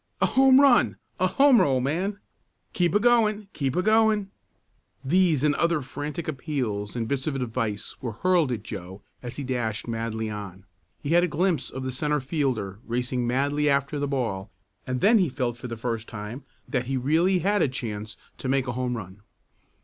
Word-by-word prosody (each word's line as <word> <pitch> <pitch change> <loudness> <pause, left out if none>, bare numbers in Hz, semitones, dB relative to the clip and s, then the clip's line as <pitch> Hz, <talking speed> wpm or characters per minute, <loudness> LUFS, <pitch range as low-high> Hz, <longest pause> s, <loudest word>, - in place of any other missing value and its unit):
"A - - +4
home 265 0 +6
run! 240 - +5 0.2
A 185 - +3
homer, 270 +4 +5
old 130 -2 +1
man!" 180 +9 -1 0.6
"Keep 175 -1 +1
a - - +6
going! 215 -3 +3
Keep 135 -3 -2
a 180 - +1
going!" 215 -2 +3 0.7
These 165 -2 +3
and 150 -1 +4
other 170 -1 +1
frantic 145 +5 -5
appeals 130 -9 -3
and 115 -2 -2
bits 135 +1 -2
of 150 - -1
advice 115 -5 -3
were 120 -3 -4
hurled 170 - +2
at 110 -4 -3
Joe 95 -2 -8 0.2
as 125 -1 -7
he 145 - -4
dashed 120 -5 -2
madly 115 -1 -3
on. 100 -3 -7 0.4
He 145 - -3
had 175 +2 +5
a - - +2
glimpse 170 -2 0
of 130 - -6
the 130 - -2
centre 150 +3 0
fielder 130 - -2
racing 125 +1 -1
madly 145 +4 +1
after 140 +1 +1
the 145 - -1
ball, 115 -8 -2 0.4
and 130 0 -2
then 220 +3 +6
he 180 -5 +2
felt 125 -3 -2
for 120 +1 -8
the 115 -1 -6
first 115 -1 -3
time 110 +5 -7 0.2
that 125 -3 -1
he 135 +1 -1
really 165 +9 +2
had 205 +1 +3
a - - +4
chance 110 -5 -5 0.2
to 130 - -3
make 135 -1 +2
a 125 - -2
home 125 0 -2
run. 95 -1 -9
135 Hz, 190 wpm, -26 LUFS, 115-170 Hz, 0.7 s, home